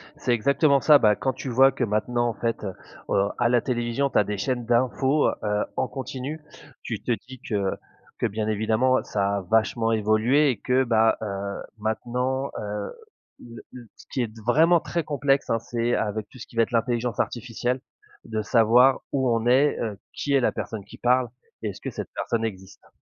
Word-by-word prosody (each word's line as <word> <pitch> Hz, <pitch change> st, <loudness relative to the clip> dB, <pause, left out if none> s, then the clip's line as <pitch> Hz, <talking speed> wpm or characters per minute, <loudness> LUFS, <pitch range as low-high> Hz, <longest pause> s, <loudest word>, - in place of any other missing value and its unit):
C'est 145 Hz, -4 st, -2 dB
exactement 140 Hz, +4 st, +3 dB
ça. 150 Hz, -2 st, +7 dB
Beh, 105 Hz, -1 st, +4 dB
quand 130 Hz, -, 0 dB
tu 130 Hz, -, -6 dB
vois 135 Hz, +3 st, +5 dB
que 135 Hz, -, -3 dB
maintenant 120 Hz, +2 st, 0 dB
en -, -, -3 dB
fait 115 Hz, 0 st, -3 dB, 0.4 s
au -, -, 0 dB, 0.2 s
à 120 Hz, -1 st, +2 dB
la 120 Hz, -1 st, +3 dB
télévision 120 Hz, +2 st, -1 dB
tu -, -, -1 dB
as 105 Hz, -, +5 dB
des 105 Hz, +1 st, -4 dB
chaînes 120 Hz, +4 st, -2 dB
d'infos, 130 Hz, +4 st, +2 dB, 0.2 s
heu, 105 Hz, 0 st, 0 dB
en -, -, 0 dB
continu. 135 Hz, +3 st, -6 dB, 0.4 s
Tu -, -, -4 dB
te -, -, -1 dB, 0.2 s
dis 130 Hz, -1 st, -10 dB
que 100 Hz, -3 st, 0 dB, 0.5 s
que -, -, 0 dB
bien 105 Hz, +1 st, -2 dB
évidemment 110 Hz, +4 st, +2 dB
ça 100 Hz, -1 st, -1 dB
a 100 Hz, -, -2 dB
vachement 115 Hz, +4 st, +1 dB
évolué 110 Hz, +7 st, +3 dB
et 125 Hz, -, 0 dB
que, 130 Hz, +1 st, +2 dB
bah, 110 Hz, -2 st, +3 dB
heu, 100 Hz, -1 st, -4 dB, 0.2 s
maintenant, 125 Hz, +5 st, -2 dB
heu, 105 Hz, 0 st, -4 dB, 0.5 s
le 115 Hz, -1 st, -11 dB
le 120 Hz, -2 st, -11 dB
ce -, -, -16 dB
qui 130 Hz, -, -1 dB
est 120 Hz, -, 0 dB
d 110 Hz, +1 st, -14 dB
vraiment 165 Hz, +8 st, +5 dB
très 170 Hz, +1 st, -3 dB
complexe, 140 Hz, -2 st, 0 dB
hein. 115 Hz, -, +1 dB
C'est 120 Hz, +1 st, -1 dB
avec 105 Hz, 0 st, -2 dB
tout 130 Hz, -, -15 dB
ce -, -, -9 dB
qui -, -, -18 dB
va 115 Hz, -, +4 dB
être -, -, -5 dB
l'intelligence 120 Hz, 0 st, 0 dB
artificielle 120 Hz, +2 st, -2 dB, 0.5 s
de 110 Hz, 0 st, -2 dB
savoir 120 Hz, +4 st, +4 dB
où 130 Hz, -2 st, +1 dB
on 115 Hz, -1 st, +1 dB
est, 135 Hz, +4 st, +4 dB
heu, 105 Hz, -4 st, -4 dB
qui 140 Hz, -, -2 dB
est 135 Hz, -, +5 dB
la -, -, +2 dB
personne 110 Hz, -3 st, -5 dB
qui -, -, -13 dB
parle 125 Hz, 0 st, +2 dB, 0.4 s
et -, -, -1 dB
est-ce -, -, -9 dB
que -, -, -4 dB
cette -, -, -6 dB
personne 115 Hz, -1 st, -1 dB
existe? 95 Hz, -3 st, -8 dB
120 Hz, 200 wpm, -25 LUFS, 110-130 Hz, 0.5 s, ça